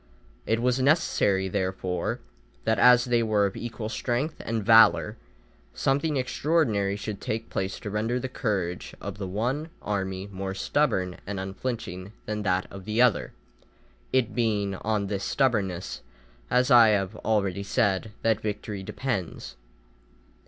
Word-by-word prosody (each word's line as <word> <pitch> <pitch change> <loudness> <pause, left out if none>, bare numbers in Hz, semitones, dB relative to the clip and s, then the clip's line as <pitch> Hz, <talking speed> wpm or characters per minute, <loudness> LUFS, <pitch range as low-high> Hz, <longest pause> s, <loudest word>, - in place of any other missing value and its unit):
It 115 +1 +1
was 125 +1 +2
necessary, 130 - +2
therefore, 95 -2 -2 0.4
that 110 -2 +1
as 125 +2 +7
they 120 -2 +2
were 105 -2 +2
of 100 - -2
equal 115 -2 -5
strength 125 +6 -2
and 115 -3 -2
valour, 115 0 +6 0.6
something 145 +2 +1
extraordinary 125 -7 +1
should 105 0 -5
take 115 +1 -4
place 95 0 -2
to 105 - -5
render 115 +4 0
the 130 - -3
courage 95 -8 -3
of - - -7
the 95 - -3
one 125 - -2
army 95 -2 -3
more 95 0 -4
stubborn 95 -6 0
and 100 -1 -3
unflinching 95 -1 -5
than 105 0 -3
that 95 -2 +1
of 95 -1 -9
the 110 +2 -1
other, 125 -6 +3 0.8
it 125 -4 +1
being 105 -4 0
on 105 -1 -1
this 100 0 -3
stubbornness, 100 -9 0 0.5
as 125 +2 +2
I 120 -2 +9
have 100 -3 +1
already 100 -3 0
said, 100 0 0
that 110 -1 +2
victory 105 -1 -4
depends. 100 -3 -4
105 Hz, 140 wpm, -27 LUFS, 95-120 Hz, 0.8 s, I